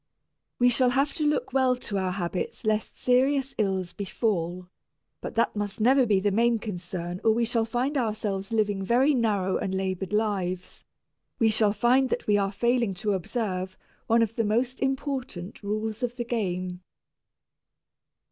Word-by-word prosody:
We 245 0 +5
shall 250 +1 +3
have 275 +3 +1
to 300 - 0
look 295 -3 0
well 260 -1 +3
to 210 -5 -3
our 185 -1 -1
habits 180 +3 -3
lest 215 0 0
serious 265 +2 +2
ills 190 -4 0
befall, 185 -3 -2 0.5
but - - -6
that 230 -1 +1
must 205 0 -3
never 255 +3 +4
be 205 -3 +3
the 205 +1 +1
main 235 +3 +3
concern 180 -3 -5
or 220 - +5
we 235 +1 +1
shall 230 -1 +1
find 245 +6 -1
ourselves 210 -5 -2
living 205 -3 +1
very 250 +8 +3
narrow 205 -7 +1
and 190 - -2
labored 190 0 -2
lives; 195 -4 -2 0.5
we 225 -3 +3
shall 215 -1 +3
find 255 +4 +3
that - - -2
we 210 - +3
are 195 -1 +1
failing 235 -1 +1
to 205 +2 -1
observe 190 -1 -3 0.3
one 230 +1 +4
of 225 0 -3
the 230 - +1
most 240 +5 0
important 265 -9 -3
rules 215 +2 -3
of 245 -1 -2
the 240 -1 -3
game. 185 -6 -2
215 Hz, 165 wpm, -27 LUFS, 190-245 Hz, 0.5 s, We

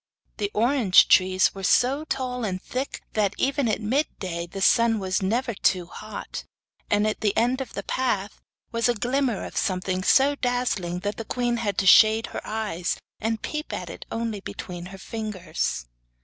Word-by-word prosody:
The 205 -2 -1
orange 230 -4 +5
trees 185 0 +4
were 195 - -8
so 260 +9 +2
tall 255 -4 -3
and 185 -4 -2
thick 260 +8 -5
that, 205 -2 +1
even 275 -1 +1
at 215 - 0
mid 265 +9 +1
day, 170 -3 -4
the 195 - -7
sun 230 +3 +4
was 190 0 -1
never 235 +5 0
too 185 -2 +1
hot, 215 +4 -7 0.5
and 205 +1 +3
at 215 - -1
the 205 -2 +1
end 250 +3 +2
of 265 - -7
the - - -4
path 210 -6 -2 0.3
was 230 0 +1
a 240 - +2
glimmer 245 0 0
of - - -9
something 185 -1 -1
so 275 +8 +5
dazzling 245 -10 -1
that 205 +1 -3
the 225 - -4
queen 240 0 -1
had 205 -4 -2
to 195 - +1
shade 220 +3 +7
her - - -4
eyes, 210 -6 -2 0.2
and 225 0 -2
peep 305 0 -4
at - - -5
it - - -9
only 225 -2 -2
between 180 -2 -7
her 195 +1 -10
fingers. 195 - -3
215 Hz, 180 wpm, -25 LUFS, 190-245 Hz, 0.5 s, shade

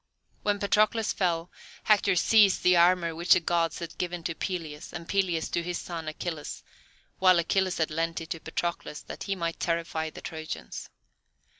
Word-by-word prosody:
When 205 -1 +1
Patroclus 215 +2 +2
fell, 175 -2 -1 0.3
Hector 205 -2 +4
seized 205 +2 +5
the 180 0 +6
armour 170 -1 +4
which 170 +2 +4
the - - +4
Gods 170 -1 0
had 165 -1 -7
given 175 -1 -3
to 165 - -2
Peleus, 160 -4 -5
and 170 -1 -7
Peleus 180 -4 0
to 170 - 0
his 175 0 -3
son 165 -2 -6
Achilles, 155 0 -5 0.6
while 185 -1 +6
Achilles 185 +2 +1
had 160 -1 0
lent 165 +1 -1
it 165 0 -9
to 165 - -2
Patroclus 165 -1 -4
that - - -7
he 195 - -1
might 170 -2 -3
terrify 165 -2 -1
the - - -11
Trojans. 160 -1 -6
170 Hz, 170 wpm, -28 LUFS, 165-185 Hz, 0.6 s, the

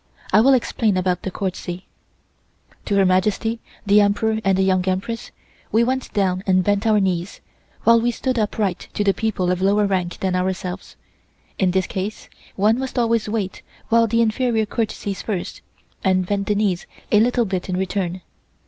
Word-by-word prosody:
(I 215 - +7
will 265 +3 +6
explain 220 -4 0
about 180 -1 0
the - - -3
courtesy.) 185 -1 -4 1.0
(To 205 - 0
Her 195 -1 +4
Majesty, 210 +5 +1 0.3
the 205 +1 +5
Emperor 220 +2 +1
and 195 -1 +2
the 190 - +3
Young 185 -1 +2
Empress, 190 +5 -2 0.4
we 225 +2 +4
went 260 +2 -1
down 185 -2 0
and 185 -1 +3
bent 205 +3 +1
our 215 -1 +4
knees, 185 -1 -1 0.4
while 230 0 +5
we 240 - +1
stood 250 +1 -1
upright 205 -3 -1
to 205 - +1
the 200 -1 +3
people 190 -5 -1
of 180 0 -1
lower 205 +2 +3
rank 185 -3 -1
than 185 -1 0
ourselves. 185 0 -3 0.6
In 190 - +3
this 185 0 +1
case 195 +3 -5 0.3
one 215 +5 +2
must 265 -1 -5
always 230 -2 +1
wait 210 -4 -3 0.3
while 230 0 +4
the 230 +1 +2
inferior 225 0 +1
courtesies 210 -3 -3
first, 195 -5 -4 0.4
and 185 -1 +2
bend 200 +1 -2
the 210 - +1
knees 200 -4 0 0.2
a 210 - +6
little 240 +1 +2
bit 190 -2 -3
in 180 - -1
return. 185 -1 -2
200 Hz, 175 wpm, -21 LUFS, 185-220 Hz, 1.0 s, I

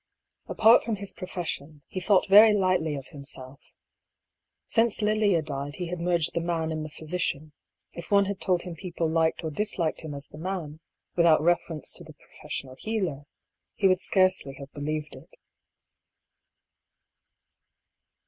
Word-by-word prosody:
Apart 225 +2 +5
from 225 - -1
his 200 -1 -7
profession, 160 -5 -5
he 185 - -5
thought 190 0 +3
very 210 +2 +8
lightly 185 -6 +1
of 135 -2 -6
himself. 140 -2 -8 1.1
Since 230 -2 +2
Lilia 210 -5 +2
died 145 -1 -5
he 180 -2 -4
had 180 0 -4
merged 170 -2 +1
the 170 - -1
man 165 -1 -1
in 155 -1 -3
the 155 - -5
physician; 155 -1 -3 0.4
if 170 - -9
one 200 -1 +5
had 200 0 -4
told 180 -3 +1
him 180 - -6
people 170 -1 -3
liked 160 +1 +1
or 160 - -3
disliked 175 -2 -1
him 155 -3 -6
as 140 0 -7
the 150 - -12
man, 165 -4 -4 0.4
without 165 -3 +5
reference 170 -2 0
to - - -10
the 155 -1 -13
professional 135 -2 -7
healer, 180 -11 -3 0.5
he 195 - +3
would 185 -1 +3
scarcely 185 -8 +1
have 140 0 -10
be 145 - -8
lieved 150 +1 -3
it. - - -15
170 Hz, 155 wpm, -27 LUFS, 155-190 Hz, 1.1 s, very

